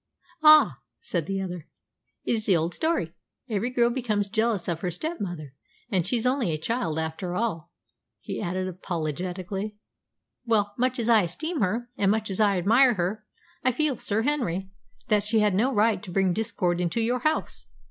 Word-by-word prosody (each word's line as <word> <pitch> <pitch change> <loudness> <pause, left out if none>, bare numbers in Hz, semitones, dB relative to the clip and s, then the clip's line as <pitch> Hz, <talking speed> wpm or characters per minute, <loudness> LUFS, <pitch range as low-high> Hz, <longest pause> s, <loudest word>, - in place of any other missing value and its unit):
"Ah!" 310 0 +7 0.2
sighed 170 - -3
the 195 0 -2
other, 180 -4 -5 0.6
"it - - 0
is 220 -2 -2
the 190 -4 +5
old 165 +2 -1
story. 315 - -1 0.3
Every 220 0 -1
girl 240 -1 +2
becomes 225 -5 0
jealous 220 -3 0
of 170 -1 -2
her 180 - -1
step 315 - -4
mother. 160 -8 -5 0.4
And 185 -5 +1
she's 240 -1 0
only 250 -5 +1
a 155 - -1
child, 165 -1 -2
after 160 +3 -3
all," 195 -7 -2 0.5
he - - -5
added 185 +2 -2
apologetically. 185 +4 -4 0.7
"Well, 210 -4 +1
much 255 +1 0
as 235 -2 -1
I 230 -3 +6
esteem 295 - -3
her, 230 +6 -1
and 195 - +2
much 215 0 0
as 190 - -2
I 205 -3 +4
admire 230 +7 +4
her, 205 +4 -2 0.4
I 255 - +3
feel, 295 +2 0
Sir 215 +2 0
Henry, 195 - -1 0.4
that 210 -1 +3
she 215 +1 +2
had 210 -2 +3
no 230 +8 +2
right 210 -4 +2
to 205 - -9
bring 190 0 +2
discord 180 -4 -1
into 175 +6 -1
your 240 +2 +1
house. 310 +5 -2
205 Hz, 180 wpm, -26 LUFS, 180-235 Hz, 0.7 s, Ah